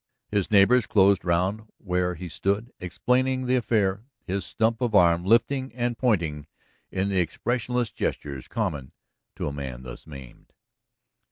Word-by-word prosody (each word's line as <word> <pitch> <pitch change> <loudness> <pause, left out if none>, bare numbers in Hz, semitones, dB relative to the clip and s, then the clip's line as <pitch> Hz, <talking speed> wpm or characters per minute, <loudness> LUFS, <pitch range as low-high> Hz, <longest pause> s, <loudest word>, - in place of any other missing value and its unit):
His 100 -3 0
neighbors 110 +4 +5
closed 100 -2 +4
round 95 +6 0
where 90 -2 -1
he 90 +2 -7
stood 100 - -2
explaining 130 +8 0
the 125 +1 +2
affair, 110 -3 0 0.2
his 95 +1 -2
stump 115 +2 0
of 120 -4 0
arm 85 -2 +5
lifting 130 +6 +2
and 120 -1 -1
pointing 85 - 0 0.4
in 95 +1 -1
the 95 -2 +1
expressionless 120 +6 -1
gestures 70 -3 -4
common 80 - -3 0.4
to - - -3
a 70 - -3
man 65 -3 -6
thus - - -10
maimed. 70 -5 -12
100 Hz, 145 wpm, -25 LUFS, 85-120 Hz, 0.4 s, neighbors